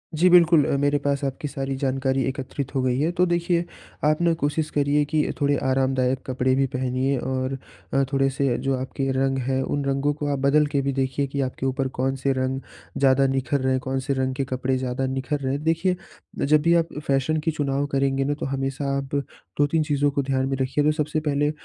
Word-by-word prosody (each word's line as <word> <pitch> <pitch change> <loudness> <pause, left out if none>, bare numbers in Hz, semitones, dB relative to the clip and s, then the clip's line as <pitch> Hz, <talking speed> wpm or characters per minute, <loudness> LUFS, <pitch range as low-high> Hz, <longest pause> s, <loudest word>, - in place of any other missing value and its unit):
जी, 175 +4 +4
बिल्कुल 170 -3 +6
अ, - - 0
मेरे 145 +1 +2
पास 140 0 0
आपकी 135 +2 -3
सारी 135 -1 -3
जानकारी 135 0 +1
एकत्रित 135 0 -4
हो 135 - +2
गई 130 0 +1
है, 155 +4 +1
तो 180 +1 +2
देखिए, 175 0 +1 0.4
आप 155 +2 +2
ना 170 -1 +3
कोशिश 150 +2 0
करिए 145 0 +2
कि 155 -1 +2
थोड़े 145 -1 +2
आरामदायक 130 -1 +1
कपड़े 130 0 0
भी 135 0 +2
पहनिए 130 +1 0
और 130 +1 -2 0.4
अ, 135 0 +3
थोड़े-से 135 -2 +1
जो 135 0 +2
आपके 135 +1 -3
रंग 135 0 +1
हैं, 135 0 +1
उन 145 +2 -2
रंगों 140 +1 +1
को 145 0 -4
आप 140 - -1
बदल 140 +3 +4
के 140 - +2
भी 140 0 -1
देखिए 135 +1 0
कि 140 +1 -2
आपके 130 0 -3
ऊपर 135 0 0
कौन-से 135 +1 0
रंग 130 0 -1 0.4
ज़्यादा 135 0 +4
निख़र 135 +1 0
रहे 130 0 +1
हैं, 130 - +2
कौन-से 130 +1 -2
रंग 130 -1 -1
के 135 - -1
कपड़े 130 0 -1
ज़्यादा 130 +1 -2
निखर 135 +3 -2
रहे 135 -1 -2
हैं। 145 +2 -3
देखिए, 165 +3 +1 0.5
जब 150 +1 +4
भी 170 +2 +3
आप 165 - -17
अ, - - -2
फैशन 135 +3 +1
के 165 - +2
चुनाव 140 -2 -1
करेंगे 135 0 +1
ना, 145 +2 0
तो 145 - -5
हमेशा 135 +1 -2
आप 140 +1 -4 0.4
2-3 145 +2 +2
चीज़ों 145 -1 +1
को 140 - 0
ध्यान 130 -1 0
में 135 - 0
रखिए, 130 +3 +1
तो 150 - +4
सबसे 150 0 -1
पहले 145 -1 0
135 Hz, 215 wpm, -24 LUFS, 130-145 Hz, 0.5 s, बिल्कुल